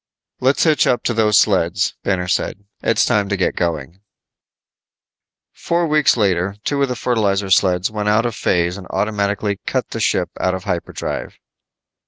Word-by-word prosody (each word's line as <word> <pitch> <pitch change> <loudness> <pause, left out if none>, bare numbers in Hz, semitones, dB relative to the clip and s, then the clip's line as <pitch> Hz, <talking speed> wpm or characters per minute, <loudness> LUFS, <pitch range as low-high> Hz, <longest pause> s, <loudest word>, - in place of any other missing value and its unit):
"Let's 130 +2 +2
hitch 155 -3 +3
up 120 -2 +1
to 120 - 0
those 110 -2 +3
sleds," 100 0 +2
Banner 90 -2 -1
said. 100 +2 -2 0.2
"It's - - +2
time 100 -2 +1
to 100 - 0
get 95 - 0
going." 85 0 -3 1.5
Four 170 0 -1
weeks 150 -4 +3
later 95 -2 +1
two 145 -1 -1
of 140 - +1
the 125 - -2
fertilizer 100 -5 0
sleds 95 -1 +3
went 105 -1 -2
out 105 +3 +3
of 120 - -1
phase 90 -2 0
and 95 - -10
automatically 100 -1 -1
cut - - -1
the - - -5
ship - - +1
out 95 0 0
of 95 - -7
hyperdrive. 85 -1 -4
100 Hz, 165 wpm, -19 LUFS, 95-110 Hz, 1.5 s, hitch